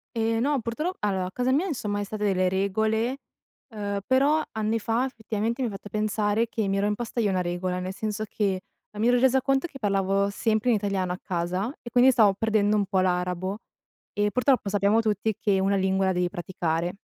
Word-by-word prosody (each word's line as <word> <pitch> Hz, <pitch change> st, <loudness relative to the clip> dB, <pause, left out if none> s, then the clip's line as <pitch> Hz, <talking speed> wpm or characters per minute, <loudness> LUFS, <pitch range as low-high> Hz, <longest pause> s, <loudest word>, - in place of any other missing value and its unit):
Eh 225 Hz, 0 st, +1 dB
no, 275 Hz, +2 st, +1 dB
purtro 300 Hz, +11 st, -2 dB
allora 190 Hz, -3 st, 0 dB
a 180 Hz, -, -6 dB
casa 250 Hz, +4 st, 0 dB
mia, 295 Hz, +8 st, +2 dB
insomma, 210 Hz, -, -2 dB
è -, -, -1 dB
stata 210 Hz, +1 st, -5 dB
delle 185 Hz, -2 st, +2 dB
regole, 220 Hz, +6 st, 0 dB, 0.5 s
ehm, 205 Hz, -3 st, -3 dB
però 280 Hz, +4 st, +3 dB
anni 220 Hz, +1 st, -1 dB
fa, 230 Hz, +4 st, 0 dB
effettivamente, 230 Hz, 0 st, -3 dB
mi 240 Hz, -, 0 dB
ha -, -, -7 dB
fatto 200 Hz, +1 st, -9 dB
pensare 215 Hz, +1 st, 0 dB
che 220 Hz, -4 st, -2 dB
mi 195 Hz, 0 st, 0 dB
ero 200 Hz, -, +1 dB
imposta 225 Hz, +3 st, -2 dB
io 210 Hz, -3 st, +2 dB
una 185 Hz, -1 st, +1 dB
regola, 180 Hz, +1 st, -2 dB
nel 185 Hz, +1 st, -4 dB
senso 215 Hz, 0 st, -3 dB
che 195 Hz, -3 st, -1 dB, 0.3 s
non 210 Hz, -, -6 dB
mi 230 Hz, -, +3 dB
ero 245 Hz, 0 st, +4 dB
resa 265 Hz, +1 st, +4 dB
conto 270 Hz, +2 st, +1 dB
che 280 Hz, -5 st, -8 dB
parlavo 195 Hz, -2 st, +1 dB
sempre 220 Hz, +3 st, 0 dB
in 235 Hz, -, +4 dB
italiano 195 Hz, -3 st, -1 dB
a 180 Hz, -, -7 dB
casa, 185 Hz, +6 st, -2 dB
e 235 Hz, -, -8 dB
quindi 250 Hz, +2 st, +5 dB
stavo 220 Hz, -6 st, +5 dB
perdendo 215 Hz, -1 st, +2 dB
un 205 Hz, -1 st, +2 dB
po' 195 Hz, -1 st, 0 dB
l'arabo 180 Hz, +1 st, -1 dB, 0.6 s
e 205 Hz, 0 st, +2 dB
purtroppo 250 Hz, -3 st, +2 dB
sappiamo 205 Hz, +2 st, +3 dB
tutti 215 Hz, 0 st, 0 dB
che 200 Hz, -2 st, +2 dB
una 195 Hz, +1 st, +2 dB
lingua 190 Hz, 0 st, +1 dB
la -, -, +3 dB
devi 180 Hz, 0 st, 0 dB
praticare, 175 Hz, -2 st, -2 dB
210 Hz, 210 wpm, -26 LUFS, 190-230 Hz, 0.6 s, quindi